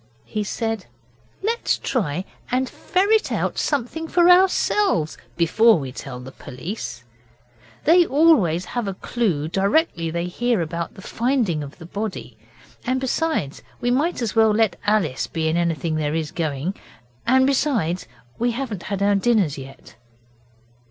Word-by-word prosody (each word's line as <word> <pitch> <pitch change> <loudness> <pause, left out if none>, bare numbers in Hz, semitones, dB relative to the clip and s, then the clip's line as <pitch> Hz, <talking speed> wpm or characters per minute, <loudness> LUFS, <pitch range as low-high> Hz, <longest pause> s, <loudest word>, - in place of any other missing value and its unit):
He 215 -1 -3
said: 225 0 -3 0.6
'Let's 460 +3 0
try 185 - -2 0.2
and 255 +1 +1
ferret 410 +9 +1
out - - -1
something 290 +3 -1
for 350 +1 +5
ourselves 370 - +3 0.2
before 220 +6 +5
we 135 -4 -5
tell 130 -1 -7
the 125 +1 -9
police. 125 - -7 0.8
They 345 +2 +6
always 265 - +4
have 240 +2 -3
a 195 - -3
clue 185 -11 -1
directly 195 - +1
they 170 +1 -2
hear 235 +5 0
about 170 0 -3
the 190 - -12
finding 235 - 0
of 140 0 -8
the 165 - -11
body. 205 +3 -5 0.5
And 255 +1 0
besides, 265 - -1 0.2
we 245 0 0
might 285 +2 +1
as 220 - -2
well 220 -1 +5
let 220 -4 +2
Alice 190 -11 +1
be 160 -1 -2
in 160 - +1
anything 165 -2 0
there 150 0 -1
is 160 -2 -2
going. 155 +1 -2 0.5
And 260 +2 +5
besides, 250 - 0 0.3
we 240 +1 +1
haven't 230 -7 -4
had 200 -1 -1
our 205 0 +4
dinners 200 - +2
yet. 135 -3 -12
205 Hz, 145 wpm, -22 LUFS, 165-255 Hz, 0.8 s, They